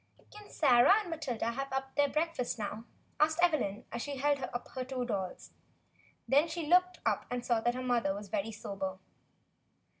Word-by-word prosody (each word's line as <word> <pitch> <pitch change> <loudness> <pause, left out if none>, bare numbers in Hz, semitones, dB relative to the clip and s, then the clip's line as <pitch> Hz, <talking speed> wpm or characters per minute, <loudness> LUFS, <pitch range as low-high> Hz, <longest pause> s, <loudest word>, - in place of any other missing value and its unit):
"Can 420 0 -13
Sarah 260 +4 +5
and 360 -5 -8
Matilda 255 -8 -2
have 275 +3 -4 0.2
their 285 0 +3
breakfast 305 -5 -1
now?" 215 +1 -5 0.3
asked 310 +1 +3
Evelyn, 290 - +1
as 235 - -4
she 285 +2 -4
held 285 +1 +2
up 245 -1 -4
her 260 - -4
two 255 -1 -3
dolls. 195 -6 -4 0.8
Then 285 +5 +4
she 330 0 -4
looked 365 +3 +3
up - - 0
and 245 -1 -3
saw 235 -2 +2
that 240 +2 +1
her 255 - -4
mother 235 -6 +1
was 205 0 -7
very 200 +3 -2
sober. 195 -3 -5
255 Hz, 175 wpm, -32 LUFS, 225-305 Hz, 0.8 s, Sarah